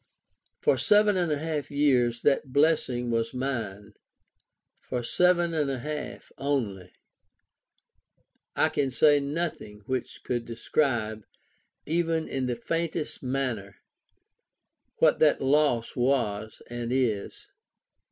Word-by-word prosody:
For - - +2
seven 210 -1 +4
and 175 -3 +1
a 150 - +1
half 150 -2 -3
years 125 -5 +2
that 140 -1 +2
blessing 130 -5 +2
was 115 +1 -1
mine; 110 -6 -4 0.9
for 125 -1 -4
seven 175 +5 +2
and 150 -3 0
a 135 - -2
half 150 +4 -6
only! 120 -10 -2 1.6
I - - +3
can 135 - 0
say 145 +4 +4
nothing 140 -8 -4
which 130 +1 -4
could 120 -1 -2
describe, 115 -3 -1 0.6
even 165 0 0
in 130 -1 -2
the 120 - -1
faintest 165 +5 -3
manner, 125 -7 -3 1.2
what - - +4
that 150 -2 +4
loss 135 -4 +2
was 115 -5 -1
and 120 0 -5
is. 120 -6 -1
135 Hz, 115 wpm, -27 LUFS, 120-150 Hz, 1.6 s, seven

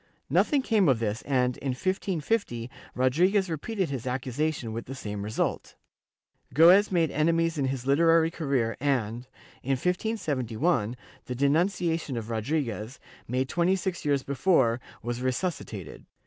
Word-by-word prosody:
Nothing 285 -4 +3
came 210 - +3
of 130 - +4
this 110 0 -2
and, 125 -3 +1
in 135 -2 -2
1550, 175 - -2 0.2
Rodriguez 175 +9 +2
repeated 185 +2 -2
his 130 -2 -4
accusation, 130 0 -2
with 115 - -5
the 135 - -6
same 105 -5 -5
result. 105 +2 -2 0.8
Goes 180 +7 +7
made 165 -4 +2
enemies 165 +1 +1
in 135 - +1
his 130 -2 -2
hterary 165 +4 +4
career 130 -8 0
and, 125 -3 -1 0.3
in 135 - 0
1571, 140 - -1 0.3
the 125 - -4
denunciation 165 +1 +1
of 115 0 -5
Rodriguez, 115 -1 -2 0.3
made 130 +2 0
twenty 175 +5 +2
six 190 -2 -3
years 140 -2 +1
before, 135 -5 +2 0.2
was 120 +1 -3
resuscitated. 130 +7 -4
140 Hz, 135 wpm, -27 LUFS, 125-170 Hz, 0.8 s, Goes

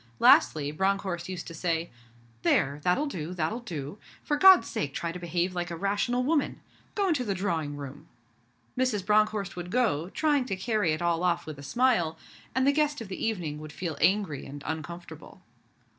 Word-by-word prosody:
Lastly, 145 +3 +5
Bronckhorst 190 0 -1
used 185 -2 -5
to 165 - -8
say, 165 0 -1 0.5
'There! 140 +2 +2
That'll 180 - +2
do, 180 - -5
that'll 180 +8 -1
do. 170 - -6 0.2
For 295 - 0
God's 380 +4 +7
sake 140 -1 -3
try 170 - -2
to 180 - -7
behave 175 +1 -1
like 175 0 -3
a 170 - -4
rational 205 +7 0
woman. 295 +2 0 0.4
Go 400 -2 +1
into 295 -7 +1
the 200 -5 -2
drawing 165 -6 -2
room.' 145 +2 -9 0.7
Mrs. 250 -7 0
Bronckhorst 210 -1 +2
would 175 0 -6
go, 180 -8 +1
trying 290 +1 +1
to 195 - -2
carry 200 -4 0
it 155 +3 -3
all 170 -1 +1
off 175 -1 +1
with 155 -3 -8
a - - -8
smile; 175 - +1 0.4
and 260 0 +3
the 280 - +5
guest 295 0 +1
of 225 -4 -8
the 190 - -5
evening 170 -9 -2
would 155 0 -8
feel 165 0 -4
angry 185 -5 +2
and 145 +1 -9
uncomfortable. 160 +2 -7
180 Hz, 185 wpm, -28 LUFS, 160-225 Hz, 0.7 s, God's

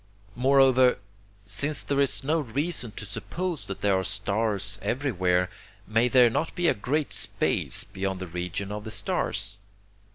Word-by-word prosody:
Moreover, 130 -1 +4 0.5
since 140 +10 0
there 140 -1 -1
is 140 -1 +2
no 155 +4 +1
reason 140 -1 -2
to 110 - -7
suppose 155 - -4
that 100 - -6
there 100 -2 +3
are - - -2
stars 100 0 -1
everywhere, 95 -9 0 0.4
may 115 +3 +2
there 125 -2 +5
not 160 +8 -2
be 175 -1 +1
a - - +5
great 140 +8 -2
space - - +2
beyond 95 -1 -4
the 95 - -5
region 90 +3 -4
of 105 0 -5
the 110 - -7
stars? 100 -2 -2
110 Hz, 155 wpm, -26 LUFS, 100-135 Hz, 0.5 s, there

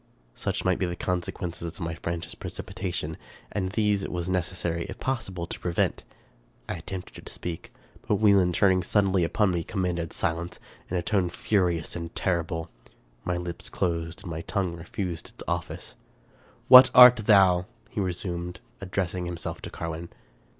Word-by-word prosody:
Such - - -3
might - - +2
be 90 - +1
the 85 - -3
consequences 90 -1 -3
of 85 +2 -8
my 85 -2 -3
frantic 85 +1 -5
precipita - - -5
tion, - - -3 0.3
and 95 -2 -2
these 105 -2 +2
it - - -4
was 85 -1 -3
necessary, 85 -2 -1
if - - -8
possible, 95 -10 -2
to - - -7
prevent. 85 -1 0 0.6
I - - -2
attempted 90 +2 -8
to - - -7
speak; 85 -2 -6 0.4
but 105 - +3
Wieland, 100 -4 +4
turning 95 -2 +4
suddenly 95 -2 +2
upon 95 +4 +2
me, 85 -2 -1
commanded 90 -3 -2
silence, 85 +1 -2 0.3
in 90 - -1
a 85 - -1
tone 95 -2 +1
furious 90 -3 0
and 85 -1 -6
terrible. 85 -2 -1 0.5
My 90 -1 -1
lips 90 -1 -5
closed, 85 +1 -2
and 90 - -6
my 80 0 -4
tongue 95 -2 -2
refused 85 0 -5
its - - -11
office. - - -4 0.4
" - - -31 0.3
What 130 +1 +11
art 125 0 +11
thou? 95 -4 +5
" - - -32
he 110 - -3
resumed, 90 -1 -3 0.2
addressing 90 -2 -2
himself 85 -1 -5
to - - -6
Carwin. 85 0 -5
90 Hz, 165 wpm, -27 LUFS, 85-95 Hz, 0.6 s, What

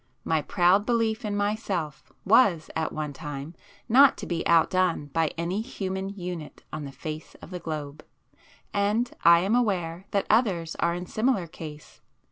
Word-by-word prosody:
My 160 -1 +1
proud 180 +5 +3
belief 230 0 0
in 210 -1 -2
myself 205 -7 -2
was, 195 -7 +4
at 160 -1 -1
one 150 -2 -4
time, 145 +2 -7 0.3
not 265 +3 +6
to - - -6
be 170 -2 -2
outdone 170 -2 +2
by 165 -1 +2
any 175 +5 -1
human 190 -4 -4
unit 180 -5 -7
on 155 -1 -4
the 140 - -7
face 155 +3 -7
of - - -13
the 180 - -5
globe. 155 -3 -6 0.7
And 210 +4 +1
I 170 0 +7
am 195 +4 0
aware 190 -7 0
that 200 - 0
others 190 -8 +2
are 170 - +1
in 180 +1 -5
similar 220 -2 0
case. 155 -2 -10
180 Hz, 160 wpm, -26 LUFS, 160-205 Hz, 0.7 s, I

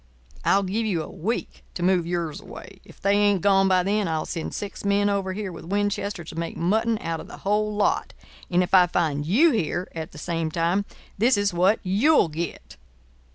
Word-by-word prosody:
I'll 200 +1 +3
give 215 +4 -1
you 170 -6 0
a - - -8
week 200 +6 -4
to 175 - -3
move 180 -2 +2
yours 170 0 -3
away. 195 -1 -11
If - - -17
they 200 +1 +2
ain't 205 -2 +3
gone 195 -1 +4
by 185 -1 +3
then, 205 +1 0
I'll 160 -1 -1
send 165 -3 -5
six 205 - -6
men 200 0 +2
over 195 -2 -1
here 205 -1 -4
with 165 - -10
Winchesters 200 -2 -2
to 165 - -6
make 170 - -4
mutton 220 +6 +1
out 165 -1 -3
of - - -9
the - - -10
whole 210 +1 +1
lot. 205 - 0 0.4
And 180 0 +3
if 180 - -6
I 180 -2 +7
find 155 -4 -1
you 285 - +5
here 180 - -1
at 160 -1 -6
the - - -13
same 165 0 -2
time 170 +5 0 0.3
this 235 +2 +4
is 205 -2 +1
what 185 +5 +3
you'll 205 - +3
get." 165 +2 -6
190 Hz, 205 wpm, -24 LUFS, 170-205 Hz, 0.4 s, I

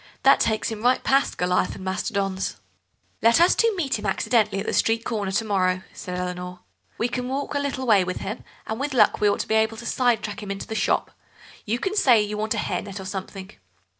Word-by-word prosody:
That - - +6
takes 220 -1 0
him 215 -1 -5
right 250 +2 +2
past 275 +1 +2
Goliath 180 0 +1
and 190 - -9
Mastodon's." 190 - -2 0.7
"Let 230 +1 +5
us 345 +2 +6
two 460 0 +3
meet 275 - -1
him 210 - -4
accidentally 215 0 +1
at 200 - -4
the - - -2
street 225 0 +1
corner 205 -4 -2
to 220 +3 +1
morrow," 185 -3 +1
said 180 0 -6
Eleanor; 180 0 -5 0.4
"we 230 - +1
can 250 0 -3
walk 275 +3 -3
a 285 - 0
little 275 -2 -3
way 210 -6 +5
with 185 0 -3
him, 215 +5 -5 0.2
and 220 +2 -4
with 280 0 -2
luck 240 - +4
we 210 - +5
ought 200 - 0
to - - -6
be - - 0
able 220 0 +2
to 235 - -9
side 240 -3 +1
track 210 0 -5
him 205 - -7
into 195 0 -4
the - - -6
shop. - - 0 0.6
You 225 +3 +1
can 385 +10 -2
say 255 - +5
you 210 0 -1
want 215 +1 -1
to - - -3
get - - 0
a - - -4
hair - - -1
net 195 -1 -8
or 190 - -7
something. 190 0 -6
215 Hz, 245 wpm, -24 LUFS, 195-245 Hz, 0.7 s, That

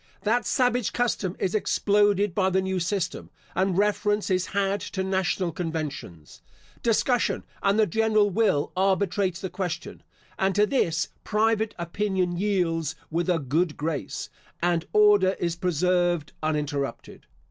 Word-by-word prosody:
That 235 +3 +1
savage 245 -3 +1
custom 210 -6 -1
is 185 - -1
exploded 205 -2 +2
by 190 +1 +2
the 190 0 +2
new 190 -1 -1
system, 180 0 -2 0.2
and 185 -1 +1
reference 210 0 +1
is 185 0 +1
had 200 0 0
to 190 - -1
national 190 -1 0
conventions. 155 - -6 0.4
Discussion 235 +1 +1 0.2
and 200 +1 +2
the 220 - +5
general 215 +1 +2
will 190 -8 +1
arbitrates 190 -1 +1
the 190 - -4
question, 180 -2 -4 0.4
and 190 0 +1
to 205 0 +5
this, 170 -9 0
private 220 0 +1
opinion 180 +1 -1
yields 170 -5 0 0.2
with 170 +3 -1
a 175 - +3
good 155 +3 0
grace, 155 +1 -4 0.3
and 175 -1 0
order 205 -3 +5
is 170 -1 -1
preserved 175 -2 0
uninterrupted. 150 -3 -3
190 Hz, 135 wpm, -26 LUFS, 170-205 Hz, 0.4 s, the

